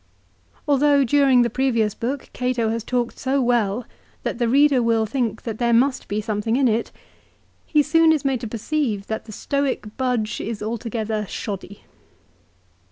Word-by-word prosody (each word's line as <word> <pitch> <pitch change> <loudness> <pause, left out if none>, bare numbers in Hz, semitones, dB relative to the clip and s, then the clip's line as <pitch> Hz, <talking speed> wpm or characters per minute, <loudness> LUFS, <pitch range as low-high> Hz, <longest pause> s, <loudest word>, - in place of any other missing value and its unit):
Although 285 0 +4
during 265 -1 +4
the 235 - 0
previous 230 -5 +1
book 255 +5 -4
Cato 250 -3 0
has 225 0 -2
talked 245 -1 -2
so 270 +1 0
well 240 -3 +1 0.4
that - - -3
the 240 -1 +1
reader 280 0 +4
will 230 -1 +2
think 230 -1 -2
that 220 -2 -5
there 235 -1 +2
must 255 +3 +2
be 205 - -2
something 215 +1 -1
in 265 0 +3
it, 230 0 0 0.8
he 300 -1 +3
soon 325 +2 +4
is 305 -3 0
made 265 -3 0
to 230 - -4
perceive 230 -2 -2
that 220 +1 -4
the 220 - -10
Stoic 280 +3 -2
budge 245 -4 -1
is 215 -1 -4
altogether 220 -1 -3
shoddy. 200 -1 -6
240 Hz, 165 wpm, -22 LUFS, 220-270 Hz, 0.8 s, Although